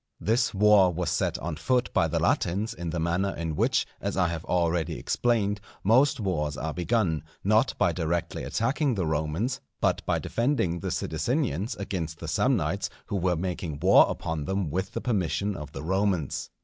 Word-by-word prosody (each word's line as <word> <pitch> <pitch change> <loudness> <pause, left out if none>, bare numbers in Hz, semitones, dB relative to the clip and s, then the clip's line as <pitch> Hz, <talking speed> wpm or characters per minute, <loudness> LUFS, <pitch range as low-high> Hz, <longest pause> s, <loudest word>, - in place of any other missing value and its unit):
This 115 +4 +1
war 100 -2 +5
was 85 -2 -2
set - - 0
on 80 -2 -4
foot 125 +9 0
by - - +3
the - - -1
Latins 100 +6 0
in 85 -5 -5
the 85 +1 -2
manner 90 +4 0
in 80 -2 -3
which, - - +2 0.2
as 100 -1 -2
I 90 -2 +3
have 85 -1 -4
already 85 -2 0
explained, 105 -4 0 0.2
most 130 +6 +4
wars 75 -8 -1
are 80 0 -3
begun, 90 - 0 0.2
not 110 +5 +3
by - - +3
directly 85 -1 -2
attacking 135 +3 0
the 95 -4 -1
Romans, 80 - -1 0.2
but - - +1
by - - +2
defending 115 - 0
the - - -3
Sidicinians 95 - -1
against 85 -5 -4
the 85 - -7
Samnites 95 - +1 0.2
who 100 - -4
were 90 -1 +1
making 85 -3 -3
war - - +6
upon 80 -2 -3
them 95 -2 -1
with 95 +4 -2
the - - -3
permission 100 -3 0
of 75 -4 -7
the - - -7
Romans. 95 -3 0
90 Hz, 175 wpm, -27 LUFS, 80-105 Hz, 0.2 s, war